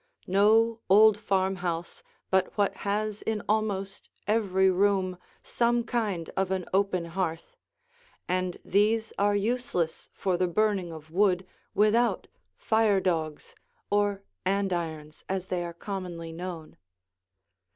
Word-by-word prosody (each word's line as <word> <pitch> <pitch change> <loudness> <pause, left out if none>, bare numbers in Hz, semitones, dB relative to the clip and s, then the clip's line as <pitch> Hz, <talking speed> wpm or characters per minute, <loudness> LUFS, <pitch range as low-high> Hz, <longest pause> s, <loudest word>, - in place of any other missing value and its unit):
No 220 +4 +4
old 215 +2 +7
farmhouse 185 -4 -1 0.3
but 190 +2 +1
what 205 -1 +2
has 210 +1 -2
in 220 -2 -2
almost 200 -2 -1 0.2
every 195 -3 +2
room 190 -1 +2 0.2
some 235 0 +1
kind 215 -8 -2
of 190 -1 0
an 190 -2 -1
open 190 -3 +1
hearth, 170 - -3 0.7
and 185 0 -1
these 220 +3 +2
are 205 0 +3
useless 205 -6 -1
for 185 -2 -1
the 180 0 +1
burning 195 -1 +1
of 155 -1 -11
wood 185 0 +2 0.3
without 220 +3 +3 0.3
fire 220 -3 +3
dogs 160 -5 -2 0.4
or 205 -1 +1 0.2
andirons, 170 -6 -2
as 190 -1 -3
they 180 -1 -1
are 170 - -5
commonly 175 -2 -6
known. 170 -2 -7
195 Hz, 120 wpm, -28 LUFS, 180-210 Hz, 0.7 s, old